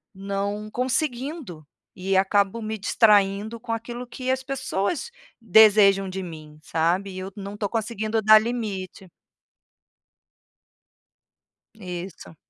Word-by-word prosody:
não 200 +2 -3
conseguindo. 255 - -3 0.3
E 190 +1 -1
acabo 200 +3 +2
me 220 0 -4
distraindo 210 +1 +2
com 230 0 -4
aquilo 240 +2 -6
que 255 +1 -3
as 260 - -1
pessoas 275 - -2 0.3
desejam 205 -2 +6
de 190 0 -5
mim, 155 -3 -10
sabe? 175 +5 0
E 185 - -7
eu 190 +1 -6
não 200 0 -7
estou 205 -1 -2
conseguindo 220 0 -2
dar 215 +1 +8
limite. 205 -5 -5 2.6
Isso. 180 -4 -8
205 Hz, 110 wpm, -24 LUFS, 190-230 Hz, 2.6 s, dar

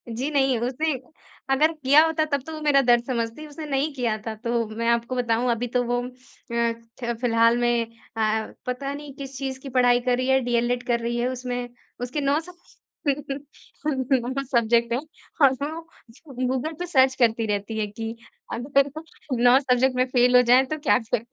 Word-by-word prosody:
जी 260 +5 -2
नहीं 270 -4 +2
उसने 260 +7 -1 0.6
अगर 310 +4 +4
किया 300 0 +5
होता 320 -1 +1
तब 280 -3 -1
तो 320 - -6
वो 310 - -6
मेरा 290 -2 +4
दर्द 240 -2 +4
समझती, 235 +3 -3
उसने 300 +1 -8
नहीं 285 +1 0
किया 235 -5 -1
था। 220 - -3
तो 235 +1 -1
मैं 230 +1 -2
आपको 235 +2 0
बताऊँ 245 0 +1
अभी 240 +1 -1
तो 245 - +2
वो 245 0 0
अ, 250 - -5 0.9
ख 235 - -1
फिलहाल 230 -1 +4
में 240 -1 +1 0.3
अ, 220 0 +1 0.2
पता 275 +2 -3
नहीं 290 -1 -8
किस 275 -1 -8
चीज़ 265 -1 -4
की 275 - -7
पढ़ाई 245 -1 +4
कर 245 0 0
रही 255 - -1
है। 265 0 +4
डीएलएड 245 0 0
कर 235 -1 +2
रही 235 +1 -2
है। 240 - 0
उसमें 245 -1 -4 0.3
उसके 250 +5 -3
9 280 +2 +2
सब 355 +2 -11 2.0
सब्जेक्ट 235 0 +2
हैं, 240 - +1 0.4
और 275 -2 +7
उसमे 280 +2 -3
वो 330 +1 -7 0.6
गूगल 265 +5 -2
पे 355 - -2
सर्च 265 -6 +3
करती 230 -3 +2
रहती 205 +1 -2
है 215 - +1
कि 225 +2 -6 0.4
अगर 275 +4 +1 0.5
9 245 +1 +7
सब्जेक्ट 255 -1 +2
में 255 - +3
फ़ेल 250 0 +4
हो 250 - +9
जाए 250 +2 +5
तो 310 +4 -4
क्या 295 - +3
करें। 230 0 -2
250 Hz, 190 wpm, -24 LUFS, 235-275 Hz, 2.0 s, हो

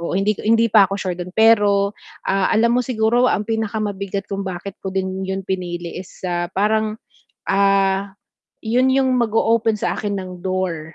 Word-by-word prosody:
oo, 170 +2 -2
hindi 200 +2 +2
ko - - -9
hindi 230 0 +4
pa 200 -3 +6
ako 195 - -3
sure 185 -2 -3
do'n. 180 0 -6
Pero, 205 -3 +4 0.3
ah, 195 0 +1
alam 230 +2 +3
mo 250 - +3
siguro 240 0 +2
ang 205 - 0
pinakamabigat 205 -3 -3
kung 195 0 -5
bakit 185 +2 -7
ko 190 - -5
din 190 0 -3
'yon 190 0 -3
pinili 175 -2 -4
is, 190 0 -13
ah, 175 -1 -1
parang, 215 +2 +1 0.5
ah, 195 0 +2 0.5
'yon 245 +4 +2
'yong 265 0 +2
mag-o-open 225 0 +2
sa 210 - -2
akin 205 -1 -2
ng 185 -2 -5 0.2
door, 175 -4 -3
200 Hz, 175 wpm, -20 LUFS, 190-220 Hz, 0.5 s, pa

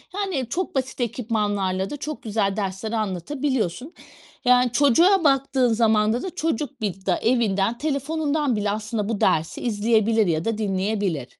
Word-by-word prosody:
Yani 355 - -2
çok 365 +2 -3
basit 260 -1 -2
ekipmanlarla 205 -5 -1
da 295 - -5
çok 300 +1 -6
güzel 205 -3 0
dersler 195 +2 -3
anlatabiliyorsun. 235 - -2 0.5
Yani 250 -1 +4
çocuğa 330 +8 +4
baktığın 270 -4 +2
zamanda 220 +1 +2
da 365 -1 -6
çocuk 290 -5 -2
bil 195 -2 -4
da 185 - +2
evinden 225 -2 +1
telefonundan 295 -2 -1
bile 205 0 -1
aslında 215 0 -3
bu 220 - -2
dersi 160 +1 +1
izleyebilir 220 -1 +2
ya 160 -1 0
da 225 -1 -1
dinleyebilir. 195 - -1
225 Hz, 140 wpm, -23 LUFS, 205-275 Hz, 0.5 s, Yani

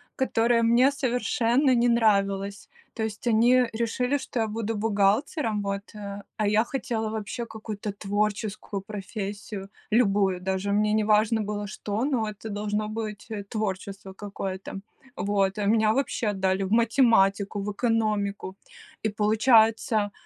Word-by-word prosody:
которая 235 -2 +2
мне 245 +4 +5
совершенно 250 0 +1
не 240 0 +3
нравилась. 200 -3 +1 0.2
То 220 - -3
есть, 220 +2 -4
они 240 +3 +5
решили, 250 +4 0
что 250 -3 -3
я 220 - 0
буду 225 +1 -3
бухгалтером, 215 - +1
вот, 200 0 -4
э, 200 -1 -7
а 215 - +1
я 210 +2 +3
хотела, 235 -3 -3
вообще, 220 +2 -4
какую-то 215 -2 -6
творческую 205 0 -2
профессию, 200 0 -6 0.2
любую, 200 -5 +3
даже 190 +2 -1
мне 210 +1 +2
не 215 0 +2
важно 215 +1 +3
было 205 0 -3
что, 210 +3 -3
но 245 -7 0
это 215 +1 -8
должно 210 +1 -2
быть, 215 -1 -5
э, 210 -2 -4
творчество 195 -2 -4
какое-то. 195 -1 -6 0.4
Вот, 200 0 0
а 205 - -1
меня, 215 +1 +3
вообще, 265 -3 -1
отдали 190 -1 0
в 190 - -4
математику, 220 -4 +3
в 210 - -3
экономику, 210 -4 -1 0.5
и, 220 - +1
получается, 220 0 +3
215 Hz, 140 wpm, -26 LUFS, 200-225 Hz, 0.5 s, мне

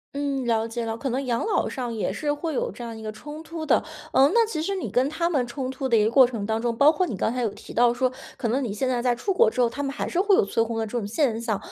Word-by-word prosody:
嗯， 280 -2 -1
了 225 -1 +1
解 235 +1 -4
了， 225 0 -3
可 270 - -4
能 265 +3 -2
养 235 -2 0
老 435 - +1
上 245 -3 -4
也 220 - -1
是 295 -1 -1
会 315 +2 -4
有 - - -1
这 240 - -9
样 230 -1 -6
一 - - -9
个 215 - -5
冲 295 +8 -9
突 325 -1 -6
的。 - - +4 0.3
嗯， 270 -1 +5
那 465 -1 +5
其 335 -8 -3
实 395 +5 -1
你 375 - -3
跟 255 +3 +2
他 335 +3 -1
们 270 -7 0
冲 255 +1 -4
突 265 0 -3
的 235 - +3
一 215 - +4
个 220 - +1
过 260 0 +7
程 230 -5 -4
当 220 +1 -1
中， 235 -1 -1
包 285 +6 +6
括 370 +3 0
你 235 - -3
刚 220 - 0
才 250 - -2
有 235 - +1
提 - - -11
到 240 0 +4
说， 255 +1 +1 0.2
可 235 - -2
能 255 +5 +1
你 235 -6 -2
现 255 +5 -1
在 245 -2 0
在 245 -1 +2
出 385 +11 -1
国 360 - +5
之 250 - -1
后， 240 - +3
他 285 +5 -5
们 275 - -1
还 - - -3
是 350 - -1
会 400 +1 +4
有 - - +4
催 200 +3 0
婚 225 0 -1
的 225 - 0
这 240 +3 -3
种 205 - -4
现 230 -1 0
象。 225 -3 -1
250 Hz, 355 characters per minute, -25 LUFS, 230-290 Hz, 0.3 s, 过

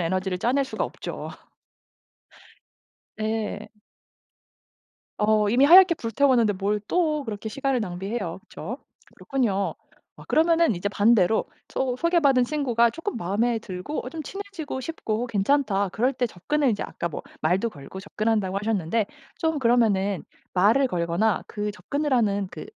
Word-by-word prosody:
에너지를 185 +2 -1
짜낼 265 +6 +1
수가 265 - -3
없죠. - - -6 1.9
네. 215 -1 -3 1.5
어 210 0 +3
이미 255 +5 +4
하얗게 360 +3 +8
불태웠는데 235 -2 +2
뭘 205 +2 -1
또 310 -5 +1
그렇게 220 -1 -5
시간을 270 +1 -1
낭비해요. 190 0 -4
그쵸? 245 +7 -8 0.4
그렇군요. 220 -8 -1 0.4
아 - - -13
그러면은 330 - +3
이제 205 +4 -2
반대로 210 -1 +3 0.2
소 255 -2 -1
소개받은 290 -6 +3
친구가 245 -5 +2
쪼끔 330 - -5
마음에 225 +4 0
들고 195 +7 -6
어 - - -3
좀 320 0 -6
친해지고 380 -7 -6
싶고 245 -5 -3
괜찮다 205 -2 +1
그럴 250 +7 +1
때 245 - 0
접근을 275 +10 0
인제 210 -3 0
아까 170 - -4
뭐 150 - -6 0.2
말도 185 +8 +1
걸고 145 +5 -10
접근한다고 205 -1 -1
하셨는데 210 0 0 0.3
좀 320 -3 0
그러면은 215 -6 +2 0.3
말을 220 +9 +4
걸거나 180 +2 0
그 210 0 -3
접근을 285 +7 -3
하는 205 -5 +2
그 155 - -7
225 Hz, 310 characters per minute, -25 LUFS, 200-275 Hz, 1.9 s, 하얗게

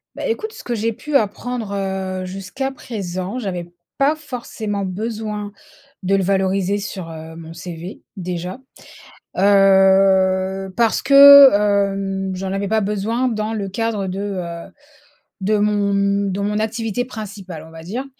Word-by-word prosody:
Bah - - -5
écoute 445 -1 -3
ce - - -11
que 240 - -3
j'ai 225 +1 0
pu 295 +6 -6
apprendre, 230 -1 -1
heu, 190 -1 -3
jusqu'à 195 +9 -4
présent, 195 -5 -5
j'avais 180 -7 -4 0.3
pas 280 +3 +3
forcément 235 -8 -5
besoin, 210 +1 -4 0.5
de 195 +2 +2
le 195 - +1
valoriser 190 +1 +1
sur, 190 -4 -6
heu, 160 0 -9
mon 165 0 -10
CV, 175 +1 -8 0.2
déjà. 180 +3 -5 0.8
Heu, 190 -1 +4
parce 230 -1 +2
que, 280 0 +10
hem, 195 -2 0
j'en 190 +1 -4
avais 195 +1 -2
pas 220 +1 +2
besoin 210 +5 -1
dans 215 -2 -2
le 200 -3 -3
cadre 210 0 -2
de, 185 +1 -4
heu, 180 -4 -5 0.7
de 210 +3 +2
mon 205 -1 +1 0.4
de 190 +1 -3
mon 210 +1 -1
activité 225 +1 -2
principale 200 -8 -8
on - - -15
va 165 0 -10
dire 220 +11 -5
200 Hz, 145 wpm, -20 LUFS, 190-220 Hz, 0.8 s, que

